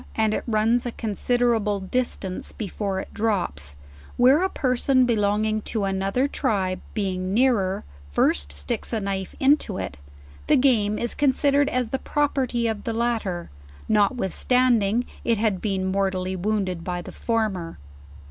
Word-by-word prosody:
and 220 -1 +2
it - - -2
runs 225 +2 +2
a 240 - -3
considerable 225 -1 0
distance 190 -2 -3
before 200 -2 -3
it - - -8
drops, 75 - -1 0.4
where 260 +6 +5
a 380 - +1
person 255 -2 +2
belonging 215 -1 +1
to 215 -1 -2
another 195 +7 0
tribe, 200 -10 -1 0.2
being 190 -2 -1
nearer, 220 -7 +2 0.3
first 70 0 +2
sticks 70 +1 -1
a 225 - +1
knife 195 -2 -3
into 270 -8 +3
it, 70 - -5 0.5
the - - +5
game 220 -6 +3
is 235 - 0
considered 285 0 +2
as 250 -2 -1
the 265 - -2
property 265 -6 0
of 220 -2 -2
the 230 - -2
latter, 225 - -2 0.4
notwithstanding 230 +1 +2 0.2
it 230 -1 +2
had 210 -3 0
been 195 -3 -1
mortally 190 -1 -1
wounded 185 -2 -1
by 180 0 -3
the - - -8
former. 210 -8 -2
215 Hz, 140 wpm, -24 LUFS, 190-245 Hz, 0.5 s, where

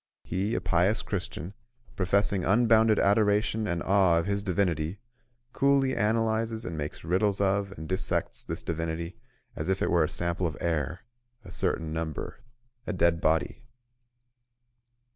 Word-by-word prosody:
He, 100 +5 -1
a - - -1
pious 90 +4 +2
Christian, 85 +7 -4 0.4
professing 100 0 +1
unbounded 110 +1 +4
adoration 105 +1 +2
and 85 -3 -2
awe 95 -3 +4
of 85 - 0
his 100 0 -1
Divinity, 90 -3 0 0.6
coolly 135 -1 +3
analyses 110 +1 0
and 85 - -4
makes 75 -1 -5
riddles 95 +4 +1
of 100 0 +1
and 80 +1 -7
dissects 95 +2 -1
this - - -5
Divinity 85 +1 -3 0.4
as - - -4
if 95 0 +1
it - - 0
were 85 -2 +4
a - - -4
sample 85 +1 -1
of 80 0 -6
air, 80 0 -1 0.4
a - - -10
certain 80 -1 -1
number, 80 -2 -4 0.5
a 105 - -1
dead 85 -2 +2
body. 80 -2 +1
95 Hz, 145 wpm, -28 LUFS, 85-105 Hz, 0.6 s, unbounded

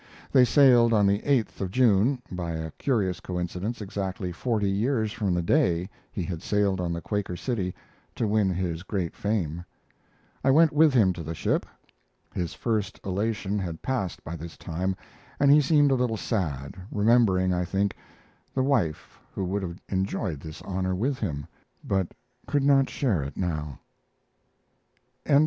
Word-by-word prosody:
They 130 -2 +6
sailed 120 -4 +6
on 105 -2 +4
the 100 +1 +3
8th 130 -5 0
of 95 - -1
June, 125 +3 +3
by 85 -2 -3
a 80 0 -4
curious 100 -9 0
coincidence 90 +5 -4
exactly 95 -2 -3
forty 105 +3 -1
years 110 +2 0
from 100 -7 0
the 85 - 0
day 85 +3 +2 0.2
he 95 - -3
had 85 -2 -4
sailed 100 -3 +1
on 85 -1 -1
the 85 0 -3
Quaker 100 -2 -2
City 95 -3 -2 0.4
to 115 - 0
win 105 -2 +2
his 90 -2 -2
great 95 -3 -3
fame. 90 -6 -1 0.8
I - - +3
went 155 +3 +6
with 155 +1 +6
him 100 -6 +5
to 85 - -7
the 80 +1 -5
ship. - - 0 0.7
His 85 -2 -3
first 105 -4 -2
elation 105 +1 -1
had 85 -4 -5
passed 120 -9 -2
by 80 - -5
this 85 0 -8
time, 90 +3 -2 0.4
and 140 0 +5
he 150 +1 +7
seemed 145 0 +4
a - - +5
little 125 -3 +1
sad, 75 - -2 0.2
remembering, 105 -4 +3
I 90 0 0
think, 100 +3 0 0.6
the 130 - +2
wife 120 - 0
who 95 - -3
would 100 +3 -1
have 85 -2 -5
enjoyed 95 -5 -2
this 80 +1 -9
honor 95 -1 -1
with 125 +7 -1
him 75 -9 -3 0.4
but 95 -3 0 0.4
could 145 -1 +1
not 135 -1 +4
share 110 - 0
it 70 +1 -6
now. 75 -6 -3 1.5
CCLVII. 140 -1 +6
95 Hz, 165 wpm, -26 LUFS, 90-115 Hz, 1.5 s, he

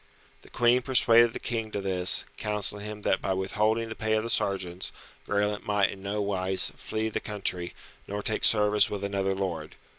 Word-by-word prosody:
The - - -18
Queen 120 +1 +3
persuaded 120 -2 +5
the - - -6
King 115 -2 -3
to 105 - -4
this, 95 -2 +1
counselling 105 -1 0
him 105 -1 -8
that 95 - +1
by 95 - -1
withholding 110 +4 0
the 110 - -5
pay 110 0 -1
of 110 0 +1
the 115 - -3
sergeants, 95 -4 -1 0.4
Graelent 105 0 0
might 105 -2 +1
in 95 - -10
no 100 +1 -2
wise 95 -1 +1
flee 110 0 -3
the - - -2
country, 95 -4 -3 0.3
nor 105 +1 -4
take 110 - -2
service 105 -1 +4
with 100 -1 -5
another 100 -1 -1
lord. 85 -5 -4
105 Hz, 185 wpm, -27 LUFS, 95-110 Hz, 0.4 s, persuaded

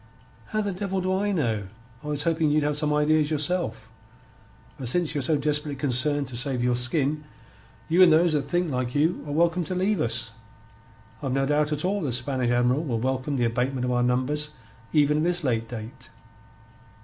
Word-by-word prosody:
"How 215 - -1
the 205 -1 -2
devil 195 0 -3
do 185 0 -1
I 205 +2 0
know? 115 - -1 0.4
I - - -8
was 145 -1 +1
hoping 160 -1 +1
you'd 150 0 +2
have 150 0 0
some 150 0 0
ideas 150 0 +2
yourself. 150 -8 -1 0.9
But 130 - -5
since 170 +4 0
Ye're 145 - -1
so 150 +4 +1
desperately 150 0 0
concerned 140 +1 +3
to 125 - -8
save 125 0 0
your 125 0 +2
skin, 140 +4 +1 0.6
you 170 +3 +3
and 180 -3 +8
those 165 +1 +4
that 150 - +2
think 175 +1 -1
like 125 0 -3
you 155 +4 +1
are - - -5
welcome 170 +3 +1
to 185 - -4
leave 190 -1 0
us. 115 -3 -1 0.9
I've 135 -3 -2
no 135 0 +1
doubt 150 +1 +1
at 150 +2 0
all 200 +2 0
the 145 -6 -2
Spanish 125 0 -1
Admiral 125 +4 +1
will 120 -8 -2
welcome 130 +3 -2
the 120 - +1
abatement 125 +2 -1
of 125 - -1
our 120 0 +1
numbers 130 +5 0 0.4
even 150 -1 +3
at 155 - 0
this 175 0 0
late 115 -4 -1
date. 115 0 -9
145 Hz, 195 wpm, -25 LUFS, 125-160 Hz, 0.9 s, and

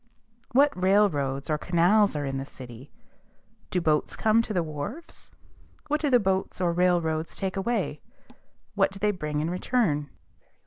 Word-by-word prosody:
What 280 +3 +4
railroads 180 -8 +1
or 150 -1 0
canals 180 +4 +3
are 145 -1 -2
in 135 0 -3
the 135 - -5
city? 125 0 -11 0.8
Do 180 - 0
boats 155 -3 0
come 220 +1 +3
to 225 - -6
the 180 -5 +1
wharves? 165 - -7 0.6
What 300 +1 0
do 295 - +1
the 250 -2 +5
boats 190 -2 -1
or 175 -2 +1
railroads 170 -3 +1
take 190 -1 -3
away? 230 +5 -2 0.7
What 195 -2 +2
do 195 - -10
they 210 +1 +1
bring 150 -6 -3
in 160 +3 -2
return? 180 - 0
180 Hz, 160 wpm, -26 LUFS, 150-210 Hz, 0.8 s, the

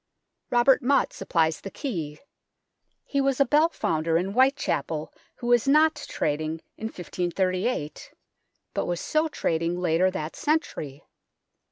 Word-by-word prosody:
Robert 245 +3 +4
Mot 275 +2 +2
supplies 160 -1 0
the 195 - -6
key. 170 - -4 0.9
He 280 - 0
was 275 -1 +1
a 275 - +5
bell 300 +5 +4
founder 165 - 0
in 185 +3 -1
Whitechapel 200 - +1 0.2
who - - -9
was 240 0 +3
not 310 +3 +5 0.2
trading 155 +2 -2
in 220 - -7
1538, 185 -1 -2 0.6
but - - -1
was 175 -1 -1
so 310 +1 +1
trading 170 - -1
later 180 +1 +2
that 165 -4 -5
century. 155 - -2
185 Hz, 130 wpm, -26 LUFS, 160-270 Hz, 0.9 s, a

